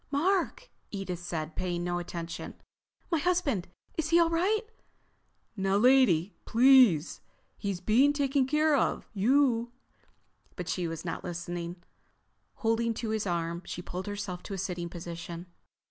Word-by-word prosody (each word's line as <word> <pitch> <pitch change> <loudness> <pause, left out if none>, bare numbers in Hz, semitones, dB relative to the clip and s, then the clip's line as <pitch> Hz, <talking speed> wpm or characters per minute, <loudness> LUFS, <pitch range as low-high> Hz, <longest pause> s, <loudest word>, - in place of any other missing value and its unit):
"Mark," 370 - 0 0.2
Edith 190 -4 -4
said, 165 -3 -4
paying 175 -1 -2
no 175 0 -1
attention. 170 -1 -6 0.6
"My 330 - +2
husband! 290 - +1 0.3
Is 315 -1 0
he 335 +1 +5
all 335 -1 +4
right?" 395 +7 +2 0.9
"Now 195 -1 +1
lady, 215 -7 +4
please. 240 - +5 0.3
He's 200 -3 -3
being 250 +9 +4
taken 280 -2 +1
care 305 +2 +3
of. 275 - 0
You—" 240 +2 +2 0.8
But 180 - -5
she 180 -2 -1
was 165 -1 -6
not - - -4
listening. 175 0 -5 0.7
Holding 225 0 0
to 225 0 -3
his 215 -2 -1
arm 170 -1 -2
she 175 - -6
pulled 185 +3 -6
herself 200 -3 -4
to 200 - -6
a - - -5
sitting 180 -2 -3
position. 170 0 -7
200 Hz, 140 wpm, -29 LUFS, 175-270 Hz, 0.9 s, he